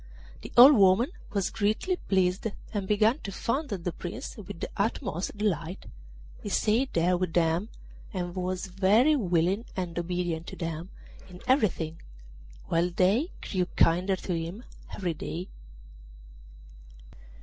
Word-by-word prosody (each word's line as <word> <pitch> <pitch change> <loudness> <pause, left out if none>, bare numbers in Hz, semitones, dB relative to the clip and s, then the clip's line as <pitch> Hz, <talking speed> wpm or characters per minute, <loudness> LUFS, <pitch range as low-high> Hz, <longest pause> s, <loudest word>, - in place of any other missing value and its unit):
The - - -9
old 265 +4 +10
woman 200 - +5 0.2
was 200 -3 -1
greatly 220 - 0
pleased, 190 - +1 0.3
and 200 -3 -2
began 215 +6 +3
to 200 - -6
fondle 245 +3 -2
the 175 0 -3
Prince 175 +2 -7
with 190 -5 -9
the - - -3
utmost 200 -3 -2
delight. 180 -4 -2 0.6
He - - -5
stayed 235 +5 +1
there 175 +2 +3
with 180 -2 -2
them, 170 +4 +1 0.4
and 175 -3 -4
was 185 0 -2
very 200 +10 +4
willing 185 - +1
and 175 -2 -3
obedient 175 -1 -2
to - - -7
them 165 +1 -5 0.4
in 180 -1 -11
everything, 190 - +1 0.6
while 170 +2 +1
they 190 - +2 0.2
grew 185 -3 0
kinder 180 +4 +3
to 185 0 -4
him 170 +8 -5 0.3
every 180 -4 -2
day. 170 +3 -6
185 Hz, 135 wpm, -28 LUFS, 175-210 Hz, 0.6 s, old